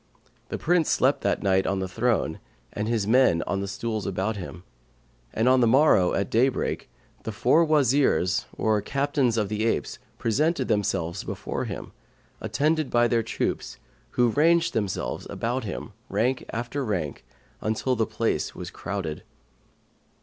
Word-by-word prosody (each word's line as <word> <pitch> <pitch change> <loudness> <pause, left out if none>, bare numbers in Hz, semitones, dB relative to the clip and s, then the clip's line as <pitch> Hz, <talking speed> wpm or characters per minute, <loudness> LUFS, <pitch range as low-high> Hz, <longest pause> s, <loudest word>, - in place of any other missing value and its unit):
The - - -3
Prince 170 -1 +2
slept - - +2
that - - 0
night 95 -1 +2
on 100 - 0
the 95 0 -2
throne 115 +4 0 0.3
and 105 +1 -2
his 115 -3 0
men 110 -7 +4
on 100 0 -1
the 100 - -3
stools 105 +2 -3
about 100 +3 -1
him, 90 -3 -8 0.7
and 110 +3 0
on 130 0 +5
the 120 - +4
morrow, 120 -8 +4
at 100 -1 -1
daybreak, 125 +3 +1 0.3
the 110 - -4
four 120 +9 +3
Wazirs 140 - +2
or 110 -1 +2
Captains 135 0 0
of 105 -2 +1
the 105 +1 -2
apes 115 - -1 0.2
presented 140 +4 +1
themselves 95 -6 -1
before - - -4
him, - - -6 0.5
attended 155 0 0
by 120 0 +3
their 115 -1 +2
troops, - - -3 0.4
who 120 -1 +5
ranged 165 +6 +3
themselves 100 - -2
about 120 +1 -2
him, 105 +3 -5 0.2
rank 125 +3 0
after 120 +5 -3
rank, 90 - -3 0.4
until 110 +4 0
the 110 -2 0
place 115 - -1
was - - -7
crowded. 95 -7 -4
115 Hz, 150 wpm, -26 LUFS, 100-130 Hz, 0.7 s, on